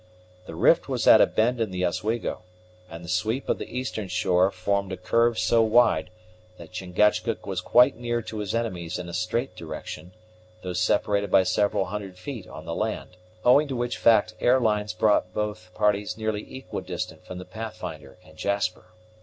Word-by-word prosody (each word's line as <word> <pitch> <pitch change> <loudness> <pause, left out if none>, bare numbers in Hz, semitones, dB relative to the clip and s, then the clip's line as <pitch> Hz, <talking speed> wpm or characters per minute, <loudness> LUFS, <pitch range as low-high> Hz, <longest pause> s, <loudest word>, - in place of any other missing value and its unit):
The - - -7
rift - - +3
was - - -1
at - - +8
a - - +6
bend 120 +2 +1
in 110 - 0
the 90 -1 -1
Oswego, 105 +7 -2 0.5
and 85 +1 -9
the - - -10
sweep 110 +9 -1
of - - 0
the - - -6
eastern 125 -5 -3
shore 90 0 +2
formed 100 +1 -1
a 95 - -4
curve 115 +5 +2
so 90 +6 +3
wide 110 -7 +3 0.5
that 85 - -12
Chingachgook 105 +4 0
was 95 -2 -3
quite 125 +5 +4
near 120 -1 -2
to 110 0 -6
his 105 +1 -3
enemies 90 -7 -3
in 90 - -6
a 85 - -8
straight 105 +9 -2
direction, 90 +2 -8 0.5
though 90 -1 -4
separated 100 +3 +1
by 95 - +5
several 95 +1 +1
hundred 100 -3 -6
feet 110 0 -7
on 80 - -10
the 85 - -4
land, 105 -2 -3 0.3
owing 140 +5 +6
to 135 - -4
which 120 0 -2
fact 110 -5 +4
air 125 +2 +4
lines 105 -3 0
brought 90 -1 +1
both 105 -4 -3
parties 105 -1 +1
nearly 110 -1 -3
equidistant 95 -9 -6
from 90 - -8
the 90 - -8
Pathfinder 110 -8 -8
and 80 -1 -18
Jasper. 100 -2 -1
100 Hz, 180 wpm, -25 LUFS, 90-115 Hz, 0.5 s, at